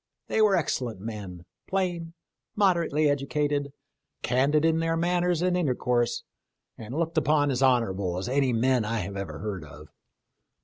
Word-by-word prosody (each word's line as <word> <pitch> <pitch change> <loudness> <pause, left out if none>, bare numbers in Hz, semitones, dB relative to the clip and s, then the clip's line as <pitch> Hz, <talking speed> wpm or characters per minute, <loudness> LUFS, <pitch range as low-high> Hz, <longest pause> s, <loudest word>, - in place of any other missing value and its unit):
They 220 - +2
were 210 -2 +5
excellent 125 - -1
men, 100 -5 -7 0.2
plain, 175 -3 -2 0.4
moderately 170 -7 +2
educated, 145 0 0 0.5
candid 140 +5 +2
in 165 0 +3
their 165 0 0
manners 175 0 +1
and 180 0 +2
intercourse, 125 -7 0 0.5
and 115 +4 -8
looked 165 0 +1
upon 145 -1 +2
as 130 0 -1
honorable 100 -9 +2
as 95 - -3
any 135 0 +2
men 125 +1 +2
I 110 +1 -1
have 100 +2 -6
ever 100 -1 -5
heard 100 -6 -5
of. 75 +1 -13
140 Hz, 145 wpm, -27 LUFS, 115-165 Hz, 0.5 s, were